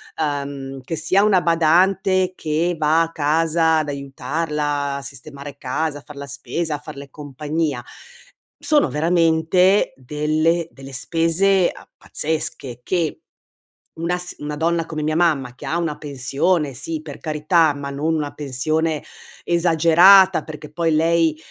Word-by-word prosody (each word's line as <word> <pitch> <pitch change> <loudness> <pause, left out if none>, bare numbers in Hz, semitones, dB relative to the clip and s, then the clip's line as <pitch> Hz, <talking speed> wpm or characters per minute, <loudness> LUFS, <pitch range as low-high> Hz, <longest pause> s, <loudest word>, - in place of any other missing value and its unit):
ehm, 140 -3 -4
che 165 +6 -5
sia 185 +6 +2
una 195 -4 +4
badante 185 +3 +2
che 165 +3 -1
va 155 +2 +3
a 165 - -5
casa 160 +2 +2
ad 155 -1 -1
aiutarla 145 +1 -3
a 140 - -5
sistemare 140 +1 -9
casa, 145 +3 -2
a - - -16
far 150 - -12
la 140 0 -7
spesa, 150 +3 -3
a 145 - -7
farle 140 -2 -10
compagnia, 145 -1 -3 0.7
sono 300 -2 +2
veramente 165 +4 +2
delle 155 +5 0
delle 135 0 -12
spese 170 +6 +2
a - - -15
pazzesche 145 -5 -3
che, 170 -4 -1 0.8
una 170 +2 -1
s 180 0 -3
una 150 0 -5
donna 165 +1 0
come 155 -2 -5
mia 155 +1 0
mamma 145 -8 +1
che - - -10
ha 165 - -1
una 165 -3 -2
pensione, 145 +2 -1
sì, 160 +5 -4
per 150 -3 -9
carità, 155 0 +2
ma 140 0 -6
non 155 +4 -1
una 150 -2 -3
pensione, 155 +3 -1 0.4
esagerata, 175 +3 +5
perché 150 -2 -10
poi 165 +1 0
lei 165 0 +2
155 Hz, 140 wpm, -21 LUFS, 145-170 Hz, 0.8 s, esagerata